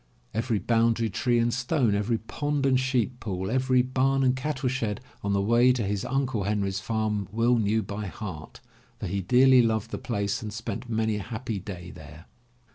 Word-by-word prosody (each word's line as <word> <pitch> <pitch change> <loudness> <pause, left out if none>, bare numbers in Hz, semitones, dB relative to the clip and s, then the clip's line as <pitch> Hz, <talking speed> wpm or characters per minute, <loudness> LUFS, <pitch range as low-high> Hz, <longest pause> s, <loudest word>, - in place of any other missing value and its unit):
Every 115 0 0
boundary 115 +2 +1
tree 120 +5 +1
and 115 0 +2
stone, 125 -2 +1
every 105 +3 +1
pond 145 +5 -2
and 130 -1 +4
sheep 125 -2 0
pool, 95 -2 -3
every 130 0 +3
bam 135 +1 +1
and 130 0 +3
cattleshed 130 -6 -2 0.2
on 100 0 -1
the 100 - +2
way 120 +4 +5
to 125 -3 -1
his 100 0 -2
Uncle 130 -6 -1
Henry's 100 -2 -1
farm 105 -1 -1
Will 115 +2 +2
knew 110 +1 +1
by 105 0 -5
heart, 90 -5 -8 0.4
for - - -4
he 100 0 -2
dearly 125 +6 +6
loved 115 -1 0
the - - -4
place 100 -4 -2
and 110 -2 -5
spent 110 +2 -5
many 110 -1 0
a - - -4
happy 110 0 -4
day 90 -2 -8
there. 80 0 -12
115 Hz, 185 wpm, -27 LUFS, 100-125 Hz, 0.4 s, dearly